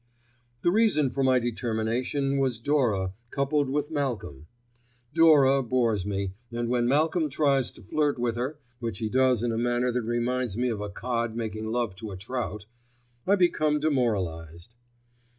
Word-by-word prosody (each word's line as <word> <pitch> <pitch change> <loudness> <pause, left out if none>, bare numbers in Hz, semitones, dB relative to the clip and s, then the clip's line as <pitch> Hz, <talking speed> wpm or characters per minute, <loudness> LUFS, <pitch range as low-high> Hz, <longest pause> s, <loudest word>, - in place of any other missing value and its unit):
The 175 - +4
reason 195 - +3
for 135 - -2
my 130 -1 +4
determination 120 +4 -1
was 130 -4 0
Dora 115 -9 +1 0.2
coupled 140 +1 0
with 145 +2 -1
Malcolm. 115 - -3 0.7
Dora 145 -4 +6
bores 115 -5 0
me, 100 -2 -2 0.2
and 120 0 -2
when 120 -1 +1
Malcolm 155 +4 +2
tries 140 -2 +2
to - - -16
flirt 145 +8 0
with 120 -1 -1
her, 130 +5 -3 0.2
which 115 -5 -4
he 110 +1 -2
does 130 -1 +3
in 120 - 0
a 115 - -1
manner 120 +1 +1
that 125 +1 -1
reminds 120 -1 -1
me 125 +1 +1
of 110 -3 -3
a 105 - -4
cod 115 +1 -3
making 110 -1 -4
love 115 -3 -1
to 110 +1 -7
a 95 - -7
trout, 105 0 -4 0.6
I 200 - +5
become 155 -5 +2
demoralised. 95 - -1
120 Hz, 160 wpm, -27 LUFS, 110-140 Hz, 0.7 s, Dora